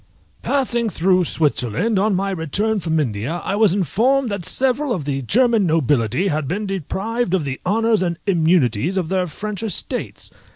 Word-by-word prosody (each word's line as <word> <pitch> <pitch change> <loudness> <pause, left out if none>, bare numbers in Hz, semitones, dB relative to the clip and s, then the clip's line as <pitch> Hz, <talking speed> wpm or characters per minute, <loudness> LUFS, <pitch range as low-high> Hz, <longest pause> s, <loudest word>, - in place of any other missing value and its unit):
_ - - -31
Passing 240 -5 0
through 185 0 +2
Switzerland 150 - 0
on 205 0 +2
my 195 +1 -1
return 195 +6 -1
from 160 -2 0
India, 130 +5 -2
I 195 - -1
was 215 -2 +4
informed 235 - +1
that 200 -4 -3
several 265 +1 +1
of 160 -9 -4
the 135 -1 -2
German 225 - +2
nobility 145 - +1
had 150 -3 -1
been 205 +8 -2
deprived 195 - -2
of 170 -6 -1
the 135 -1 -5
honours 225 +1 +2
and 170 -2 -1
immunities 165 - +2
of 175 -4 -1
their 185 -1 0
French 205 +5 -5
estates. 220 -3 -3
190 Hz, 170 wpm, -20 LUFS, 155-220 Hz, -, was